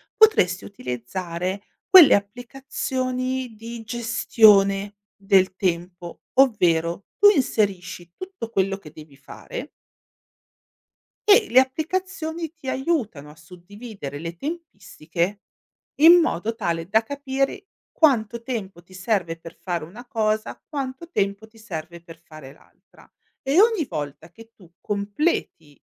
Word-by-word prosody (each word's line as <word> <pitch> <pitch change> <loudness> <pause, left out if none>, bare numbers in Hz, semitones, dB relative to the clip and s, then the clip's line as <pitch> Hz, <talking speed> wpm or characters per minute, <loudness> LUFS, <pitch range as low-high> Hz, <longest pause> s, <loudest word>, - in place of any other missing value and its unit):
potresti 200 - +4
utilizzare 180 - -5 0.3
quelle 365 -6 +9
applicazioni 255 +2 -3
di 230 +1 -8
gestione 210 -4 +3 0.2
del 195 -2 +2
tempo, 175 -1 -3
ovvero, 180 -9 +2
tu 410 - +8
inserisci 185 - -1
tutto 370 - -8
quello 195 -2 0
che 155 -6 -14
devi 150 -3 -14
fare 485 - -9 1.6
E 420 +1 +6
le 255 - +6
applicazioni 325 +3 -2
ti 310 -6 -7
aiutano 250 - -2
a 150 - -14
suddividere 180 - -10
le 165 +2 -7
tempistiche, 200 - -4 0.6
in 340 +2 +9
modo 225 - -1
tale 170 -6 -3
da 220 +3 +3
capire 275 - -3 0.2
quanto 235 -6 +2
tempo 200 -8 -6
ti 185 +2 -20
serve 185 -4 -2
per 165 0 -12
fare 175 -3 -3
una 215 +10 -11
cosa, 220 -3 -2
quanto 275 +2 -6
tempo 200 - -2
ti 225 +1 -23
serve 170 -6 -8
per 165 -1 -14
fare 155 -5 -13
l'altra. - - -24 0.3
E 280 +6 +2
ogni 435 -6 +4
volta 150 +2 -6
che 225 +6 -16
tu 180 -4 -19
completi, 200 - -3
210 Hz, 120 wpm, -23 LUFS, 175-265 Hz, 1.6 s, quelle